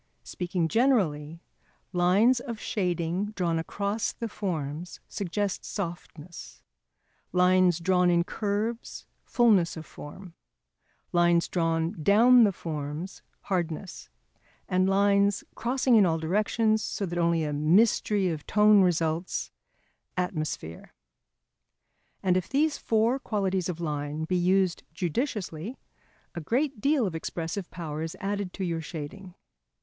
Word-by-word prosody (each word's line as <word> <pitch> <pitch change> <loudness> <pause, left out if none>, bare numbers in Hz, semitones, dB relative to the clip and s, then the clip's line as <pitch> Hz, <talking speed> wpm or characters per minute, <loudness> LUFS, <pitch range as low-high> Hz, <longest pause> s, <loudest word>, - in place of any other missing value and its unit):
Speaking 180 -2 -2
generally, 170 - +1 0.5
#lines 195 +8 +4
of 235 -3 -6
shading 180 +1 -2
drawn 170 -5 0
across 200 +6 -2
the 230 - -5
forms 170 -5 -4
suggest 200 0 -3
softness, 170 -3 -7 0.7
lines 180 -1 +4
drawn 180 +1 +2
in 170 -1 +3
curves 215 +5 -3 0.2
fulness 205 -9 +3
of 160 - -7
form, 175 +6 -11 0.8
lines 175 -1 +3
drawn 165 -1 -1
down 230 +7 +6
the 205 - +2
forms 155 +1 -6 0.2
hardness, 175 -1 -4 0.6
and 185 0 +2
lines 200 0 +3
crossing 250 +1 0
in 210 - +6
all 165 -1 +1
directions 215 +6 +1
so 200 - -3
that 175 -1 -3
only 170 -1 +2
a 150 -1 -2
mystery 190 +5 +3
of 155 -3 -5
tone 210 -1 +5
results, 170 -1 0 0.7
atmosphere#. 155 - -4 1.3
And 185 -2 +3
if 185 -1 -1
these 300 +2 +2
four 230 +4 +1
qualities 195 -6 -1
of 170 -2 -4
line 150 -1 -3
be 180 +3 -1
used 185 0 +2
judiciously, 195 - -3 0.6
a 170 - -5
great 255 - -1
deal 280 -2 +2
of 185 - -3
expressive 165 +3 -4
power 160 -4 -5
is 160 0 -5
added 200 -1 -3
to 195 - -4
your 165 -2 -2
shading. 170 +4 -8
180 Hz, 120 wpm, -27 LUFS, 165-205 Hz, 1.3 s, down